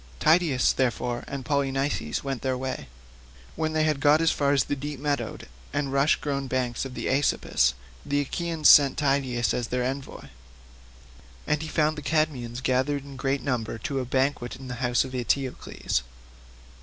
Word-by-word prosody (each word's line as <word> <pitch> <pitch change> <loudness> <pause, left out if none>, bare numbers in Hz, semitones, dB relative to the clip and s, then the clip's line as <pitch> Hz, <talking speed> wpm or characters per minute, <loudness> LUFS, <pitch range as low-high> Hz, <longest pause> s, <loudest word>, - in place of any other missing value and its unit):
Tydeus, 155 -5 +3
therefore, 125 -1 -1
and 140 -2 -6
Polynices 140 -1 -1
went 135 -2 -3
their 130 -1 -1
way. 130 - -4 0.7
When 155 0 -1
they 155 0 +2
had 155 -2 +1
got 145 +2 +5
as 165 -1 +3
far 140 -1 +2
the 135 +2 +1
deep 145 0 -6
meadowed 145 0 -3 0.3
and 145 -1 -1
rush 140 +3 +4
grown 140 -2 -3
banks 125 -1 -1
of 130 -2 -7
the - - -4
Aesopus, 130 - +2 0.3
the 145 0 0
Achaeans 160 +2 0
sent 140 -2 +7
Tydeus 135 -4 +1
as 120 -2 -2
their 125 0 -1
envoy, 130 - -5 1.2
and 150 0 0
he 160 - -5
found 155 -1 +1
the - - -8
Cadmeans 140 -6 -1
gathered 135 +2 +1
in 140 -1 -10
great 135 0 -1
numbers 115 -4 -2
to 140 -1 -1
a 130 - -2
banquet 130 -1 0
in 130 -1 -10
the - - -3
house 120 -1 +2
of 130 - -9
Eteocles. 130 - -1
135 Hz, 170 wpm, -26 LUFS, 125-145 Hz, 1.2 s, sent